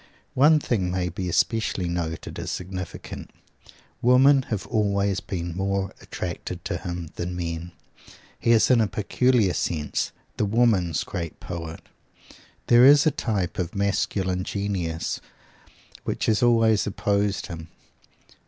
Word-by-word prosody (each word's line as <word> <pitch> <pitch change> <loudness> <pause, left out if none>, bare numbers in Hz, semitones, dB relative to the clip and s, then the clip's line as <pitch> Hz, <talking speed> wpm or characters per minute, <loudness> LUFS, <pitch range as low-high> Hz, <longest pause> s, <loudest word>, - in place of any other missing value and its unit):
One 150 +4 +5
thing 105 -10 -1
may 90 -1 -1
be 90 +1 -4
especially 105 -1 +1
noted 85 -2 -4
as - - -4
significant: 95 0 -6 0.7
Women 135 +3 +6
have 110 -4 -2
always 100 -3 +1
been 85 -3 -5
more 95 0 -1
attracted - - -6
to - - -2
him 85 -2 -6
than 90 +1 -3
men. 85 0 -4 0.7
He - - -1
is 115 +2 +5
in 120 -2 +5
a 110 - +2
peculiar 110 0 +2
sense 75 -4 -1 0.3
the - - +1
Woman's 100 -6 +2
great 85 -2 -5
poet. 85 -2 -6 0.8
There 120 0 +6
is 145 +3 +8
a 155 - +4
type 100 -11 -2
of 90 +1 -3
masculine 95 -2 0
genius 95 -5 -2 0.8
which - - -2
has 110 -2 +2
always 115 -3 +4
opposed 100 0 0
him. 80 -3 -8
100 Hz, 130 wpm, -25 LUFS, 90-110 Hz, 0.8 s, is